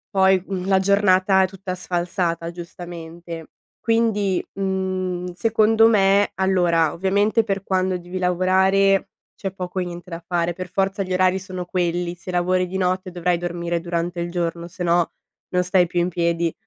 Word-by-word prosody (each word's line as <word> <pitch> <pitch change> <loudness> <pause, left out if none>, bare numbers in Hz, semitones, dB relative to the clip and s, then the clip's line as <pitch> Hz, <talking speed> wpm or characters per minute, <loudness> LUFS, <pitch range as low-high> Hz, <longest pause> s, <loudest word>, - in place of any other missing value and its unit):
poi, 190 -1 +4
mhmm, 190 -1 -4
la 190 -1 +4
giornata 190 0 +4
è 190 - +3
tutta 190 0 -6
sfalsata 175 -2 -2
giustamente, 170 -1 -8 0.3
quindi, 215 -5 +1
mhmm, 185 -2 -2
secondo 225 +3 +4
me 200 -2 +4
allora, 175 -4 +2
ovviamente 200 +6 +2
per 195 -2 -2
quando 185 -1 0
devi 175 +1 -7
lavorare, 190 +2 +2 0.2
c'è 195 -2 -5
poco 185 0 -4
e 180 - -1
niente 175 +1 -8
da 165 -1 -5
fare, 175 -1 0
per 180 +1 -6
forza 195 +1 0
gli 185 -1 -2
orari 185 +1 +3
sono 185 -1 -6
quelli, 175 -1 -1
se 185 +2 -11
lavori 180 +1 +1
di 185 - -7
notte 185 0 0
dovrai 175 0 0
dormire 170 0 -2
durante 170 +1 -3
il 170 0 -2
giorno, 170 -1 -3
sennò 175 -1 +1 0.4
non 180 0 +3
stai 180 0 +3
più 175 +1 0
in 175 - 0
piedi. 170 -1 0
185 Hz, 160 wpm, -22 LUFS, 175-190 Hz, 0.4 s, poi